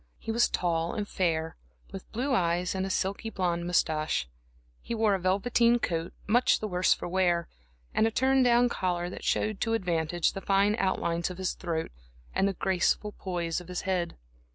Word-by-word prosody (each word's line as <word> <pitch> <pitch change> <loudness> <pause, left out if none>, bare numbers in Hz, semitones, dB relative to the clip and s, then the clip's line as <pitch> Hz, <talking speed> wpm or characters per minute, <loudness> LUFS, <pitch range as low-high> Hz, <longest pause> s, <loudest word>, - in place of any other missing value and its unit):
He 225 - -5
was 235 +2 +3
tall 170 0 -1
and 210 -2 -2
fair, 165 -4 -1 0.3
with 195 - -9
blue 260 +4 -1
eyes 175 -4 +1
and 190 0 -2
a - - -5
silky 195 +4 -1
blonde 175 -4 -1
moustache, 155 - +1
and - - -28 0.5
he 235 - -4
wore 220 -2 +3
a 195 - 0
velveteen 235 +6 +3
coat, 165 -6 -2
much 240 +4 +4
the 215 - -3
worse 180 -1 +1
for - - +1
wear, 175 -2 +1 0.5
and 220 - +3
a - - +2
turn 265 +3 +3
down 245 -1 +5
collar 180 -5 -2
that - - -8
showed 215 -2 0
to 225 - +1
advantage 175 -4 0
the 195 - -5
fine 200 +2 +3
outlines 170 -3 0
of 180 - -7
his 185 -1 -1
throat 165 -3 -3 0.4
and 195 - +2
the 200 - 0
graceful 190 +3 0
poise 175 -2 -2
of 175 - -13
his 180 -1 -4
head. 180 -3 -2
185 Hz, 190 wpm, -28 LUFS, 175-215 Hz, 0.5 s, down